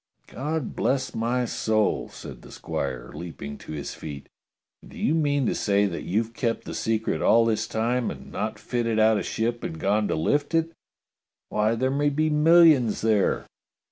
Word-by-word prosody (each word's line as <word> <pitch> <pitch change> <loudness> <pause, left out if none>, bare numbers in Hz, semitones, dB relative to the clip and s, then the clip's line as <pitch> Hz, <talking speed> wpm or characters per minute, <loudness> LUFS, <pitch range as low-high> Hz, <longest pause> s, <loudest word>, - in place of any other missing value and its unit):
"God 150 +1 -4
bless 130 -1 0
my 120 +2 0
soul!" 110 -2 0
said - - -10
the - - -14
squire, 60 -1 -4
leaping 80 -4 -7
to - - -10
his 75 -2 -5
feet; 70 -3 -8 0.5
"and - - -15
do - - -12
you 150 - +1
mean 145 -4 +1
to - - +1
say 100 0 +2
that 90 -4 -4
you've 110 +4 -1
kept 115 -2 -1
the - - -6
secret 110 -1 -1
all 115 0 +5
this 110 -1 0
time 120 +2 0
and 65 -1 -9
not 105 +3 -3
fitted 115 -2 -1
out 110 -1 +4
a - - -2
ship 115 +1 -2
and 80 - -5
gone 105 +3 +1
to - - 0
lift 145 - 0
it? 165 0 +1 0.8
Why, 105 +2 +1
there 130 +3 0
may 145 +1 +2
be 155 +2 0
millions 150 -6 +5
there 110 -3 +2
115 Hz, 180 wpm, -25 LUFS, 105-135 Hz, 0.8 s, all